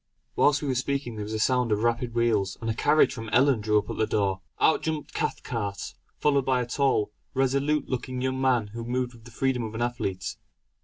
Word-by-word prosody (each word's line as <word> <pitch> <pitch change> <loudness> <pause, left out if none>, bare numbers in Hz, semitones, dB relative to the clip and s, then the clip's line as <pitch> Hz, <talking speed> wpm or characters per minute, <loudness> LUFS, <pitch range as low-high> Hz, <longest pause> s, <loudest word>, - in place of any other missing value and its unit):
Whilst 145 0 +3
we - - -2
were 135 - +1
speaking 130 -1 -1
there 105 -1 -4
was 110 - -5
a - - 0
sound 125 +1 +2
of 105 +1 +1
rapid 120 0 0
wheels, 110 -5 +1
and 115 - -5
a 115 - +1
carriage 150 +6 +3
from 115 -4 -6
Ellon 130 0 +4
drew 105 0 +2
up 105 - 0
at - - -6
the 110 - +1
door. 95 -2 0 0.2
Out - - +4
jumped 155 -2 -3
Cathcart, 105 -6 -3 0.2
followed 140 -2 +2
by 130 -1 +2
a 125 - -1
tall, 125 -4 +1 0.2
resolute 140 +3 +1
looking 130 0 -3
young 130 +1 -1
man 125 -5 +2
who 115 0 -5
moved 125 +1 -2
with 115 -2 -17
the - - -11
freedom 130 +1 0
of 110 -1 -5
an 115 - -3
athlete. 100 -6 -3
120 Hz, 220 wpm, -27 LUFS, 110-135 Hz, 0.2 s, Ellon